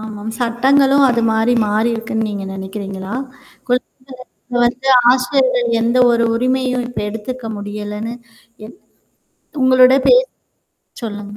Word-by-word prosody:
ஆமாம். 215 0 -8
சட்டங்களும் 270 +4 +2
அது 235 -1 +1
மாரி 220 +2 +1
மாறிருக்குன்னு 225 +1 -1
நீங்க 200 -2 -5
நெனக்கிரிங்களா? 195 +1 -7 0.5
குழ 245 - +3 0.9
வந்து 250 +3 -1 0.2
ஆசிரியர்கள் 255 -1 +1
எந்த 235 +2 +1
ஒரு 235 0 +1
உரிமையும் 255 0 -1
இப்ப 245 - -7
எடுத்துக்க 225 +3 -7
முடியலன்னு 210 +2 -6 0.5
என் 240 - -13 0.8
உங்களோட 255 0 +5
பேச. - - +5 0.8
சொல்லுங்க. 205 -2 -7
235 Hz, 105 wpm, -17 LUFS, 210-255 Hz, 0.9 s, உங்களோட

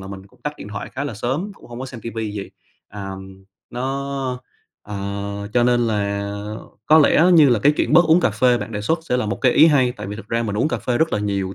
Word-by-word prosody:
là 95 - -9
mình 95 0 -9
cũng - - -26
tắt 150 - -3
điện - - -9
thoại 100 -1 -6
khá 140 +2 -4
là 130 - -4
sớm, 135 - -3
cũng - - -17
hông 120 +1 -8
có 130 - -4
xem 125 -3 -9
ti 115 - -6
vi 110 -2 -3
gì, 100 -2 -6 0.4
à, 100 -1 -7 0.6
nó 135 +3 -3 0.8
ờ, 105 - -5 0.6
cho 120 - +4
nên 120 -1 +3
là 100 -2 -1 0.6
có 155 +1 +7
lẽ 155 +1 +5
như 155 -5 +7
là 120 -3 +3
cái 145 +8 +4
chuyện - - 0
bớt 170 +3 +7
uống 165 +2 +4
cà - - +2
phê 120 +3 +2
bạn 115 - -6
đề 105 - -3
xuất 160 +11 0
sẽ 125 -6 -1
là 125 - -1
một 100 -2 -2
cái 125 - +4
ý - - +7
hay. 130 -6 +3
Tại 120 - -8
vì 105 +1 -6
thực 110 - -11
ra 115 0 0
mình 105 -3 -3
uống 120 - +1
cà - - -2
phê 120 -1 -1
rất 160 - +1
là - - +1
nhiều 100 -2 -2
120 Hz, 270 wpm, -21 LUFS, 105-140 Hz, 0.8 s, có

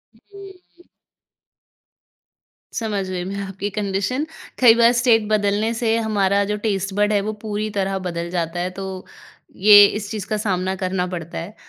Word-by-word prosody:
हुँ। 385 - -16 1.9
समझ 210 -4 -2
गई 180 -1 -3
मैं 195 +2 -5
आपकी 195 +1 -5
कंडीशन। 205 +7 -1 0.3
कई 240 -3 +8
बार 235 0 +5
स्टेट 235 -3 +3
बदलने 210 +1 +1
से 225 -1 0
हमारा 200 -3 +1
जो 210 - -1
टेस्ट 195 -1 -2
बड 210 +1 +2
है 205 - +3
वो 215 +2 -3
पूरी 215 0 -3
तरह 195 0 0
बदल 170 0 -4
जाता 170 -1 -2
है 180 +1 -1
तो - - -4 0.8
ये 205 -1 +10
इस 205 0 -3
चीज़ 210 -3 -5
का 215 - -1
सामना 190 -3 -1
करना 185 -1 -1
पड़ता 170 -2 -6
है। 180 +6 -7
205 Hz, 160 wpm, -21 LUFS, 190-220 Hz, 1.9 s, ये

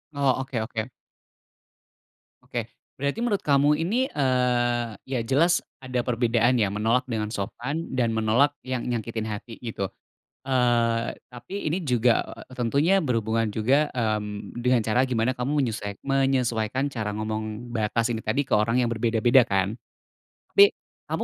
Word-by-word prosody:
Oh 135 -2 +2
oke 125 -4 -3
oke. 110 +1 -4 1.5
Oke, - - -4 0.3
berarti 140 +9 -2
menurut 205 -4 0
kamu 145 +1 +4
ini, 225 +11 0
eee, 120 -4 +1
ya 130 -2 -2
jelas 155 +9 +3 0.2
ada 125 -1 -1
perbedaan 120 0 +2
ya, 100 -3 +1
menolak 115 +4 +1
dengan 110 -4 -2
sopan 125 +9 -4
dan 120 -3 +1
menolak 120 +7 +3
yang 130 -2 -2
nyakitin 115 -2 -3
hati, 110 +2 -7
gitu. 110 -5 -4 0.6
Eee, 120 -2 +2
tapi 125 +10 -6
ini 175 +2 -1
juga 125 -4 +3 0.3
tentunya 145 +11 +2
berhubungan 115 -4 0
juga, 130 +8 +2
mmm, 105 -4 -3
dengan 125 -1 +2
cara 110 +4 +2
gimana 125 -1 0
kamu 125 +3 -2
menyesuek 105 -4 -3
menyesuaikan 135 -2 +1
cara 110 -6 -3
ngomong 110 +2 -4
batas 115 +2 0
ini 110 -1 -3
tadi, 125 +6 +1
ke - - +2
orang 115 +4 +2
yang 120 - +1
berbeda-beda 115 +2 +4
kan. 100 +1 0 0.8
Tapi, 405 +1 +6 0.3
kamu - - -2
120 Hz, 140 wpm, -25 LUFS, 110-135 Hz, 1.5 s, Tapi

